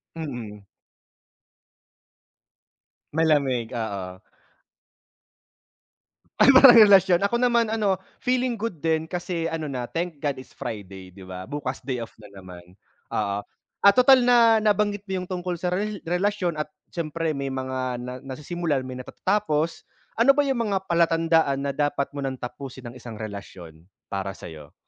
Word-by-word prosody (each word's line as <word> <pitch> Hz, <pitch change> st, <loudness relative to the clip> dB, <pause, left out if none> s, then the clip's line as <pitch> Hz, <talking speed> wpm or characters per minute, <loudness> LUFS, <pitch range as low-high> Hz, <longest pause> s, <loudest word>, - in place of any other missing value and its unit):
Mm. 120 Hz, -10 st, -7 dB, 2.5 s
Malamig, 140 Hz, -7 st, +1 dB
oo. 100 Hz, -5 st, -5 dB, 2.2 s
Ay 270 Hz, -, +7 dB
parang 260 Hz, -2 st, +9 dB
relasyon 195 Hz, -4 st, +6 dB
ako 200 Hz, -, 0 dB
naman 235 Hz, -3 st, +2 dB
ano 205 Hz, -4 st, +1 dB, 0.2 s
feeling 250 Hz, -1 st, +1 dB
good 225 Hz, -5 st, -3 dB
din 160 Hz, 0 st, 0 dB
kasi 175 Hz, -2 st, -3 dB
ano 160 Hz, -1 st, -4 dB
na 125 Hz, -4 st, -4 dB
thank 165 Hz, -3 st, -4 dB
God 145 Hz, -3 st, -1 dB
it's 130 Hz, -, -12 dB
Friday 95 Hz, -3 st, -7 dB
di 95 Hz, +1 st, -13 dB
ba 95 Hz, +2 st, -8 dB
bukas 140 Hz, -2 st, -4 dB
day 130 Hz, -1 st, -3 dB
off -, -, -11 dB
na 105 Hz, -, -13 dB
naman 90 Hz, -2 st, -13 dB, 0.3 s
oo, 100 Hz, 0 st, -1 dB, 0.4 s
at 200 Hz, -, +7 dB
total 255 Hz, +1 st, +7 dB
na 235 Hz, -2 st, +5 dB
nabanggit 205 Hz, -1 st, +1 dB
mo 190 Hz, -1 st, -2 dB
yung -, -, -10 dB
tungkol 180 Hz, -1 st, -3 dB
sa 180 Hz, +1 st, -2 dB
rel 205 Hz, +2 st, -2 dB
relasyon 180 Hz, +1 st, 0 dB
at 150 Hz, -, -3 dB, 0.2 s
siyempre 165 Hz, -1 st, -2 dB
may 140 Hz, -1 st, -3 dB
mga 130 Hz, 0 st, -4 dB, 0.2 s
na 125 Hz, 0 st, -6 dB
nasisimulan 145 Hz, +1 st, -3 dB
may 130 Hz, 0 st, -7 dB
natatatapos. 165 Hz, +2 st, -1 dB, 0.3 s
Ano 275 Hz, +4 st, +6 dB
ba 290 Hz, -, +3 dB
yung 270 Hz, -3 st, -1 dB
mga 195 Hz, -2 st, -1 dB
palatandaan 165 Hz, -5 st, +2 dB
na 140 Hz, -, -1 dB
dapat 145 Hz, 0 st, -1 dB
mo 145 Hz, -, -7 dB
ng 135 Hz, -1 st, -3 dB
tapusin 130 Hz, -1 st, -8 dB
ang -, -, -16 dB
isang 115 Hz, -2 st, -9 dB
relasyon 95 Hz, -6 st, -9 dB, 0.2 s
para 95 Hz, 0 st, -3 dB
sayo? 75 Hz, -4 st, -11 dB
155 Hz, 145 wpm, -24 LUFS, 125-190 Hz, 2.5 s, parang